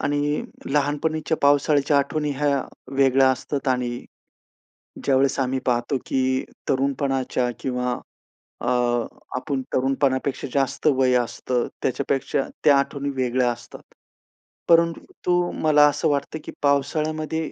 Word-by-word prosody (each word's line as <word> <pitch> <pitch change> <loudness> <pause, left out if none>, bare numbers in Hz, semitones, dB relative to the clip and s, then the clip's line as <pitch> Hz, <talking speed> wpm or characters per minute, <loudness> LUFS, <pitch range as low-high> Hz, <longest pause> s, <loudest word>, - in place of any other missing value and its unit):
आणि 145 +1 0 0.2
लहानपणीच्या 150 +3 0
पावसाळ्याच्या 145 0 +4
आठवणी 150 +2 -1
ह्या 140 -1 +1 0.3
वेगळ्या 135 -1 +5
असतात. 135 +1 -3
आणि 125 -1 -1 1.0
ज्यावेळेस 135 0 +2
आम्ही 130 0 0
पाहतो 120 +2 +1
की 130 0 0 0.3
तरुणपणाच्या 135 -2 0
किंवा 125 -1 -2 0.6
अ, - - -3 0.7
आपण 135 +1 -2
तरुणपणापेक्षा 135 +1 0
जास्त 135 +1 0
वय 130 -3 +3
असतं, 120 0 -1
त्याच्यापेक्षा 135 +2 0 0.2
त्या 145 - +6
आठवणी 140 0 -2
वेगळ्या 125 -1 +1
असतात. 120 -1 -10 0.9
परंतु 170 +1 +2
मला 150 -1 +6
असं 145 +2 0
वाटतं 145 +2 -1
की - - -6
पावसाळ्यामध्ये 155 +2 0
140 Hz, 105 wpm, -23 LUFS, 130-145 Hz, 1.0 s, त्या